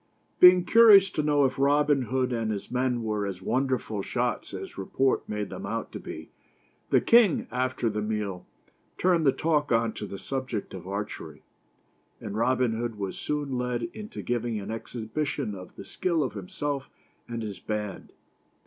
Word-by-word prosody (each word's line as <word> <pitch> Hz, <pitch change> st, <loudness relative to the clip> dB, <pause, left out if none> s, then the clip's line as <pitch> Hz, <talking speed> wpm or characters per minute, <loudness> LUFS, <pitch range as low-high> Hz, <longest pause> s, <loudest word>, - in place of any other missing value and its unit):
Being 180 Hz, 0 st, +8 dB
curious 210 Hz, -5 st, +7 dB
to 155 Hz, -, -1 dB
know 145 Hz, -1 st, +3 dB
if 130 Hz, 0 st, -1 dB
Robin 145 Hz, 0 st, +3 dB
Hood 130 Hz, 0 st, 0 dB
and 115 Hz, -2 st, -1 dB
his 100 Hz, +1 st, -5 dB
men 125 Hz, -1 st, 0 dB
were 105 Hz, -2 st, -1 dB
as 95 Hz, -2 st, -5 dB
wonderful 125 Hz, -1 st, -1 dB
shots -, -, -2 dB
as -, -, -7 dB
report 130 Hz, +7 st, 0 dB
made 105 Hz, -1 st, -3 dB
them -, -, -7 dB
out -, -, -4 dB
to -, -, -6 dB
be, -, -, -9 dB, 0.6 s
the -, -, +5 dB
king, 230 Hz, -7 st, +5 dB
after 130 Hz, 0 st, -1 dB
the 105 Hz, -1 st, -1 dB
meal, 105 Hz, -4 st, -3 dB, 0.5 s
turned 175 Hz, -4 st, +3 dB
the -, -, +7 dB
talk 150 Hz, +1 st, 0 dB
on 115 Hz, -1 st, +2 dB
to 105 Hz, -, -6 dB
the 100 Hz, -, -7 dB
subject 130 Hz, -3 st, -4 dB
of 95 Hz, -1 st, -8 dB
archery, 100 Hz, -7 st, -6 dB, 0.8 s
and 100 Hz, -, -6 dB
Robin 125 Hz, +1 st, +2 dB
Hood 115 Hz, -1 st, -3 dB
was 100 Hz, -2 st, -4 dB
soon 145 Hz, -4 st, -2 dB
led 125 Hz, -1 st, -2 dB
into 215 Hz, -1 st, -7 dB
giving 120 Hz, -2 st, -1 dB
an 100 Hz, +2 st, -6 dB
exhibition 115 Hz, +3 st, -3 dB
of 90 Hz, -2 st, -10 dB
the -, -, -9 dB
skill 170 Hz, -4 st, 0 dB
of 130 Hz, -, -3 dB
himself 135 Hz, +8 st, -4 dB, 0.4 s
and 115 Hz, -1 st, -4 dB
his 105 Hz, -3 st, -6 dB
band. 105 Hz, -2 st, -4 dB
120 Hz, 170 wpm, -27 LUFS, 105-145 Hz, 0.8 s, Being